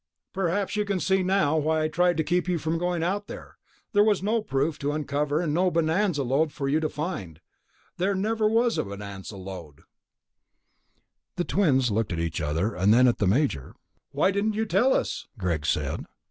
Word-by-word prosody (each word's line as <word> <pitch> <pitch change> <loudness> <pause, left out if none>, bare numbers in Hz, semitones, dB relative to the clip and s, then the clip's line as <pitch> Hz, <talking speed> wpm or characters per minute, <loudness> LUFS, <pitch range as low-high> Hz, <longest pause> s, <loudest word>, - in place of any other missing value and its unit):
Perhaps 195 +2 -1
you 210 - +1
can 200 -2 -1
see 190 +1 +2
now 185 -5 +2
why 155 +1 +1
I - - +2
tried 175 +2 +1
to 160 - +2
keep 180 +3 0
you 180 -1 +1
from 160 +1 -2
going 175 -1 -1
out 200 +4 -1
there. - - -10 0.3
There 205 0 +5
was 210 -3 +2
no 220 +3 +1
proof 150 -6 -1
to 145 +1 -1
uncover 150 +1 -1
and 155 -4 -1
no 180 +3 +3
bonanza 165 -1 +1
lode 140 +5 +1
for 140 -2 -4
you 145 +3 +2
to 155 -1 -1
find. 100 - -5 0.6
There 195 +3 +1
never 215 +2 +1
was 230 +1 +2
a - - +1
bonanza 100 0 -8
lode." 90 -6 -9 1.5
The 175 - -1
twins 135 - +2
looked 110 0 0
at 85 - -2
each 85 -1 -2
other, 80 +8 -1
and 95 +3 +2
then 125 +3 +6
at 120 - +1
the 100 - +2
Major. 105 - 0 0.3
"Why 190 - +2
didn't 205 +2 0
you 220 +1 0
tell 220 +7 +3
us?" - - -2
Greg 85 -7 -2
said. - - -1
160 Hz, 195 wpm, -26 LUFS, 115-190 Hz, 1.5 s, then